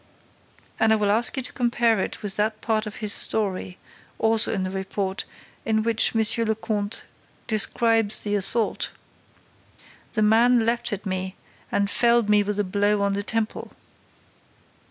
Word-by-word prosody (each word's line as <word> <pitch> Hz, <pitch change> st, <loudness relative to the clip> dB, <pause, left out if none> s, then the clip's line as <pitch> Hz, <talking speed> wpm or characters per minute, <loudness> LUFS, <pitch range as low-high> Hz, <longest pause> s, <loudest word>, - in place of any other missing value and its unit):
And 220 Hz, -, +3 dB
I -, -, +6 dB
will 205 Hz, -2 st, +1 dB
ask 230 Hz, +5 st, +1 dB
you 265 Hz, -, -1 dB
to -, -, -5 dB
compare 235 Hz, -3 st, +1 dB
it -, -, -4 dB
with 200 Hz, -2 st, -3 dB
that 215 Hz, +1 st, 0 dB
part 220 Hz, -1 st, -1 dB
of 210 Hz, -, -7 dB
his 205 Hz, -, +3 dB
story, 190 Hz, -3 st, -3 dB, 0.4 s
also 225 Hz, 0 st, +2 dB
in 195 Hz, -3 st, -1 dB
the 185 Hz, -, -3 dB
report, 190 Hz, 0 st, -3 dB, 0.4 s
in 220 Hz, -1 st, 0 dB
which 230 Hz, 0 st, +2 dB
Monsieur 225 Hz, +1 st, +3 dB
le 220 Hz, -1 st, 0 dB
Comte 210 Hz, -1 st, -3 dB, 0.4 s
describes 225 Hz, -1 st, +2 dB
the 205 Hz, -, -2 dB
assault: 205 Hz, +3 st, +1 dB, 1.2 s
'The 215 Hz, -, +1 dB
man 230 Hz, +2 st, +4 dB
leaped 235 Hz, +1 st, 0 dB
at 205 Hz, 0 st, -5 dB
me 185 Hz, 0 st, -3 dB, 0.4 s
and 200 Hz, 0 st, +1 dB
felled 235 Hz, +1 st, +3 dB
me 210 Hz, 0 st, +5 dB
with 205 Hz, 0 st, -2 dB
a 205 Hz, -, +1 dB
blow 205 Hz, +1 st, +1 dB
on 200 Hz, 0 st, +1 dB
the 200 Hz, -, -1 dB
temple! 220 Hz, +1 st, -3 dB
215 Hz, 160 wpm, -24 LUFS, 200-225 Hz, 1.2 s, I